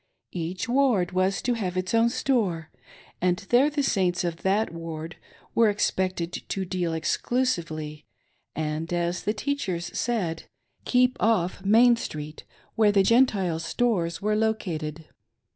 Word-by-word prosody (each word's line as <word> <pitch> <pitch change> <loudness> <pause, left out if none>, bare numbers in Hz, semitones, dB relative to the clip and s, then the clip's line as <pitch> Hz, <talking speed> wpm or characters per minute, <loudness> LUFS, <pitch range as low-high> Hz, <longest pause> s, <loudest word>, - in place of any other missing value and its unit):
Each 180 +6 -3
Ward 240 -8 +2
was 185 +1 0
to 245 - +1
have 185 -6 -3
its 185 +2 -2
own 230 +1 +4
store, 225 - -1 0.5
and 180 0 +2
there 255 +5 +5
the 295 -1 -1
Saints 185 -8 +1
of 170 -2 -2
that 195 +2 0
Ward 165 0 -6 0.4
were 230 -2 +4
expected 185 -4 -1
to 190 -1 -4
deal 180 -2 -2
exclusively, 160 -6 -2 0.5
and, 155 +1 -3
as 175 0 -1
the 210 - -1
teachers 205 -9 -3
said, 185 -9 -1 0.2
" - - -42
keep 250 0 +3
off 195 -4 +1
Main 230 +4 +5
street 150 -7 -7 0.3
where 215 -2 +4
the 200 -1 +4
Gentile 195 -8 +3
stores 170 -1 -1
were 210 0 +1
located." 165 -8 -2
185 Hz, 140 wpm, -26 LUFS, 170-230 Hz, 0.5 s, there